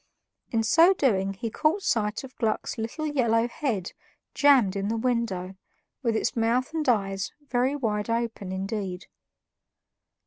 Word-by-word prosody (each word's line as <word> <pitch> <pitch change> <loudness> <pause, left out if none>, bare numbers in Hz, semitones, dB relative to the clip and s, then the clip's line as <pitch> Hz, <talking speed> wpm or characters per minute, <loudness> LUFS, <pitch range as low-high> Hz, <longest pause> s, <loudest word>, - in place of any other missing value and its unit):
In 225 -1 +1
so 330 - +5
doing 195 - +1
he 225 +3 -4
caught 320 - +1
sight 220 - 0
of 265 0 -11
Gluck's 225 0 -1
little 230 +8 -3
yellow 235 -6 +2
head 235 - -3 0.4
jammed 260 -9 +4
in 200 0 -1
the 225 +2 -1
window, 225 -6 -1 0.5
with 230 -4 0
its - - 0
mouth 240 +5 +1
and 310 -4 0
eyes 195 -4 0 0.2
very 255 +3 +2
wide 215 -6 -2
open 230 -4 -2
indeed. 190 -1 -4
230 Hz, 140 wpm, -26 LUFS, 205-255 Hz, 0.5 s, so